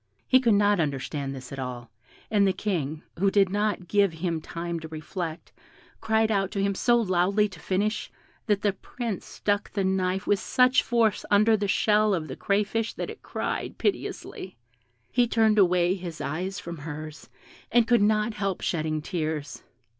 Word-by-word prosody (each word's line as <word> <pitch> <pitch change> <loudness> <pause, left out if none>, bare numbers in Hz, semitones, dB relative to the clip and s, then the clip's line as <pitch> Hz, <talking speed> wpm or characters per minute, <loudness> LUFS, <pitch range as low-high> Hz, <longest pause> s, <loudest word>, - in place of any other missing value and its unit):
He 260 - +6
could 235 -5 +3
not 205 -1 +3
understand 140 -2 -2
this 130 -1 -9
at 135 - -6
all, 125 -3 -6 0.4
and 205 -2 +4
the 190 - +2
King, 165 -6 -2 0.2
who 195 +1 +4
did 195 -1 +3
not 205 -2 -1
give 200 -1 +3
him 165 -1 -2
time 170 +1 -4
to 160 - -8
reflect, 160 +1 -6 0.5
cried 220 0 +2
out 195 -2 +1
to 200 - -2
him 200 0 +1
so 240 +5 +3
loudly 200 0 +2
to - - -12
finish, 205 +4 -1 0.4
that 205 -1 +1
the 205 -2 +2
Prince 225 +1 -5
stuck 205 0 -1
the 200 - -1
knife 190 0 0
with 205 - +2
such 255 +1 +4
force 230 -4 +1
under 215 +2 +5
the 205 -1 -1
shell 210 +1 +3
of 160 -3 -4
the 130 - -5
crayfish 210 +3 0
that - - -4
it - - -12
cried - - -4
piteously; 190 - -3 0.5
he 245 0 +3
turned 220 -2 +3
away 180 -1 +4
his 175 -4 -6
eyes 185 +6 -3
from 170 -2 -7
hers, 155 +1 -8 0.4
and 235 0 +4
could 240 -3 +4
not 215 +1 +2
help 195 -3 -2
shedding 155 -2 -1
tears. 155 -4 -3
195 Hz, 175 wpm, -26 LUFS, 165-210 Hz, 0.5 s, He